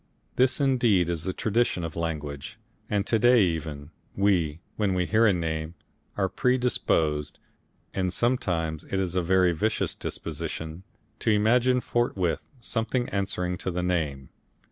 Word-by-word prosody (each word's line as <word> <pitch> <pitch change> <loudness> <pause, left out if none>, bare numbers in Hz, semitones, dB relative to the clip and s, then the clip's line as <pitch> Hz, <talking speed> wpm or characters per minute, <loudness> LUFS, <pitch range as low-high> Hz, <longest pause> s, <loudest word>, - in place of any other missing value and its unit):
This 130 +2 +2
indeed 120 - +3
is 85 -2 -3
the 95 - 0
tradition 110 -2 0
of 80 -2 -5
language, 75 -4 -4 0.3
and 100 -1 0
to 115 - +1
day 120 -1 +6
even, 80 -4 -3 0.2
we, 90 -6 +2 0.2
when 100 -3 0
we 90 -1 +1
hear 110 +4 +4
a - - +5
name, 80 -2 -2 0.4
are 95 -2 +2
predisposed 95 - +1 0.6
and 95 -1 0
sometimes 90 -10 0
it 95 - -2
is 90 -2 -1
a 90 - +3
very 90 +1 +3
vicious 105 +7 0
disposition 80 +2 -5 0.4
to - - 0
imagine 120 +4 +3
forthwith 100 -10 -1
something 120 +1 -1
answering 90 -3 -2
to - - -3
the 90 0 -2
name. 75 -7 -1
90 Hz, 145 wpm, -27 LUFS, 80-110 Hz, 0.6 s, day